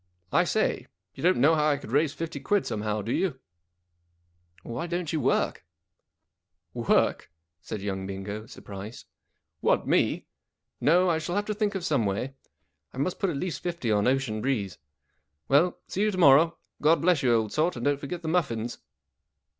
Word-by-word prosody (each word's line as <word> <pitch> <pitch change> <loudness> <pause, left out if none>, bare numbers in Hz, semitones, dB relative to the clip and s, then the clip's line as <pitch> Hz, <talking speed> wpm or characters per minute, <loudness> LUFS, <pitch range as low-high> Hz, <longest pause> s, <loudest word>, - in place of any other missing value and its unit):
I - - +4
say, - - 0 0.3
you - - -10
don't 180 +2 +3
know 145 +6 +5
how 155 -1 +3
I 145 - +2
could 125 - -10
raise 145 +2 +3
fifty 165 +2 -5
quid 205 -2 +1
somehow, 105 -1 -2
do 115 - -3
you? 150 -6 0 0.4
" 85 -1 -47
" 85 +1 -33
Why 120 +8 -4
don't 175 -2 -3
you 155 - 0
work? - - +1 0.4
" - - -57 0.2
" - - -54
Work? - - +1 0.2
" 80 0 -56
said 105 -3 -6
young 95 -1 -3
Bingo, 100 +3 -6
surprised. 105 -2 -9 0.3
" - - -52
What, - - +2
me? - - +2 0.5
No, 180 +5 +4
I 165 -2 +2
shall 175 +3 -3
have 205 0 0
to 210 - -2
think 210 -1 -1
of 185 -3 -3
some 135 -10 +1
way. 105 +7 -2 0.6
I - - -13
must 160 +7 -1
put 195 - +1
at 155 - -2
least 180 +3 -3
fifty 170 -10 -2
on 105 +1 +2
Ocean. 130 -5 0
Breeze. 105 -8 -2 0.7
Well, 160 +6 +3
see 195 - -3
you 215 - +3
to 195 - -3
morrow. 165 +1 +6 0.2
God 160 +3 +4
bless 175 -4 +3
you, 120 -4 +3
old 110 -2 0
sort, 160 +4 +1
and 120 - -5
don't 145 -1 +2
forget 170 +5 -6
the - - -4
muffins." 120 -9 -1
140 Hz, 195 wpm, -27 LUFS, 110-170 Hz, 0.7 s, morrow